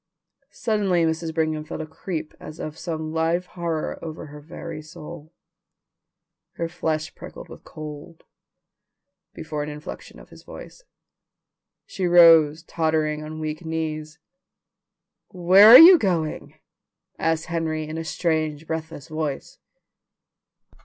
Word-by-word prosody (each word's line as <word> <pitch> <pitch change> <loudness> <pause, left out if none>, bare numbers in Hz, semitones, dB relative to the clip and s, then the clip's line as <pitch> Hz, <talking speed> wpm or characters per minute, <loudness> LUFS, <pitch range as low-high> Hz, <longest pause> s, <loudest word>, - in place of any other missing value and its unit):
Suddenly 200 -6 0
Mrs. 160 0 -2
Brigham 155 -1 -1
felt 155 - -7
a 155 - -4
creep 160 0 -6
as 155 +1 -10
of 155 - -6
some 160 -2 -5
live 165 +2 0
horror 170 -3 -4
over 160 -1 -7
her 150 0 -12
very 165 0 -8
soul. 155 +1 -11 1.2
Her 170 - -3
flesh 160 -2 -3
prickled - - -11
with - - -13
cold, 155 +1 -10 1.1
before 155 -1 -5
an 150 - -4
inflection 150 +1 -9
of - - -16
his - - -14
voice. - - -12 1.0
She 185 -3 -3
rose, 165 -3 +6
tottering 155 -2 -1
on 155 +1 -8
weak 155 +1 -5
knees. 160 -1 -4 1.1
"Where 185 +2 +6
are 235 +3 +12
you 340 +4 +10
going?" 170 - -2 0.6
asked 165 0 0
Henry 160 -2 -3
in 155 +1 -5
a - - -4
strange, 160 -2 -2
breathless 160 -3 -6
voice. 155 -3 -5
160 Hz, 125 wpm, -23 LUFS, 155-170 Hz, 1.2 s, are